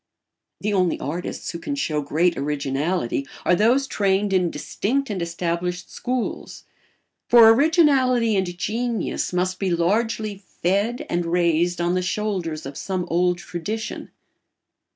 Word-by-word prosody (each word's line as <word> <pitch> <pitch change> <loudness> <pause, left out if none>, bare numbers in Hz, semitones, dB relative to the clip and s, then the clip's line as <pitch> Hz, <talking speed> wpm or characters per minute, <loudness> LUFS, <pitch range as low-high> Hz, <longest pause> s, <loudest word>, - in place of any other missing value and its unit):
The 210 +1 -1
only 180 -3 +1
artists 160 +6 -4
who 170 - -6
can 285 - -3
show 155 - -1
great 165 +5 +1
originality 140 0 -1 0.2
are - - +4
those 235 +9 +3
trained 200 -4 +1
in 180 -2 +3
distinct 230 - -2
and 190 -3 -3
established 170 +1 -3
schools; 250 -1 -4 0.6
for 235 -2 +8
originality 255 -4 +4
and 180 -2 -1
genius 230 +4 -2
must 185 +1 -1
be 195 - 0
largely 210 +4 0 0.3
fed 210 - +1
and 175 0 -1
raised 175 0 +1
on 175 +1 +1
the 185 - +1
shoulders 185 -5 -2
of 135 0 -7
some 185 -2 -2
old 180 +1 +2
tradition. 205 +6 -5
185 Hz, 130 wpm, -23 LUFS, 170-220 Hz, 0.6 s, for